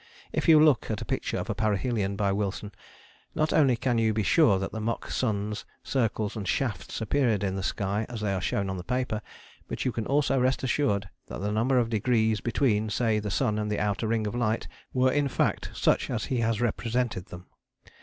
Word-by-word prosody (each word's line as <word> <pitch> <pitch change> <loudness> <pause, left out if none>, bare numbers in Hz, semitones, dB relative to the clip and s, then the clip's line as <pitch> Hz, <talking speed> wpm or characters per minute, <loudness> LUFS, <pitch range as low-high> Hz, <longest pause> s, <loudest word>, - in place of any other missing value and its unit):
If - - 0
you 155 -1 +8
look 150 -7 +4
at 110 - -2
a - - -7
picture - - -2
of - - -3
a - - -1
parhelion 105 -1 0
by 100 -2 +1
Wilson 100 +1 -2 0.6
not 155 0 +1
only 135 -5 +4
can 120 -1 +1
you 110 -1 +2
be 110 - +1
sure 115 - +4
that 95 - -3
the 110 - -5
mock 115 +2 -3
suns, 105 -3 -1 0.2
circles 115 -4 -1
and 105 -4 -4
shafts 100 -4 -2
appeared 115 -3 +1
in 95 -1 -1
the 95 - -2
sky 100 +3 -1
as 120 -3 -6
they 105 -2 0
are 95 - -2
shown 100 +2 -1
on 95 -1 -4
paper, 125 0 -2 0.5
but - - -4
you 130 - +2
can 115 -2 -4
also 140 -1 +2
rest 130 +2 +1
assured 125 -7 +1 0.2
that - - -6
the 105 +1 -1
number 120 +5 +2
of 120 -2 +1
degrees 110 -1 +2
between, 110 -3 +1
say, 110 0 +1
the 105 0 -4
sun 105 +4 0
and 105 0 -2
the 105 - 0
outer 105 +2 -1
ring 110 -1 0
of 105 - -3
light 115 -2 0 0.2
were 130 0 +3
in 145 +1 +1
fact - - 0
such - - +2
as - - -2
he 130 - -1
has 115 -2 +1
represented 120 -3 -1
them. 90 +1 -10
110 Hz, 215 wpm, -27 LUFS, 105-125 Hz, 0.6 s, you